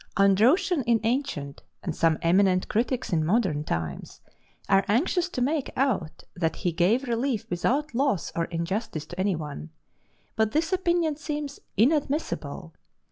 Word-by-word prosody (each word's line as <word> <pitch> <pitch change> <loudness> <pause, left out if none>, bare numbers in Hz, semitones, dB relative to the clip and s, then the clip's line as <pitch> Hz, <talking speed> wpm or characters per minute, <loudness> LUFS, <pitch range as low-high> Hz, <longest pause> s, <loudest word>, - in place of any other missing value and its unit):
Androtion 250 - +4
in 235 -1 +4
ancient, 225 - -2 0.2
and 170 -5 -3
some 165 -2 +2
eminent 185 +2 +3
critics 240 -1 -1
in 160 -2 +2
modern 175 -4 +1
times 80 - -4 0.5
are 195 0 +4
anxious 340 - +1
to 250 - -1
make 290 +1 0
out 235 - -1
that 165 -2 -1
he 175 - -1
gave 210 - +2
relief 235 -1 -1
without 270 - 0
loss 260 - 0
or 165 - 0
injustice 170 -1 -3
to 175 +3 -10
any 190 -1 +1
one. 145 - -6 0.7
But 220 -1 +1
this 325 +4 +1
opinion 345 -4 +1
seems 295 -2 -5 0.2
inadmissible. 290 - 0
220 Hz, 140 wpm, -26 LUFS, 170-280 Hz, 0.7 s, Androtion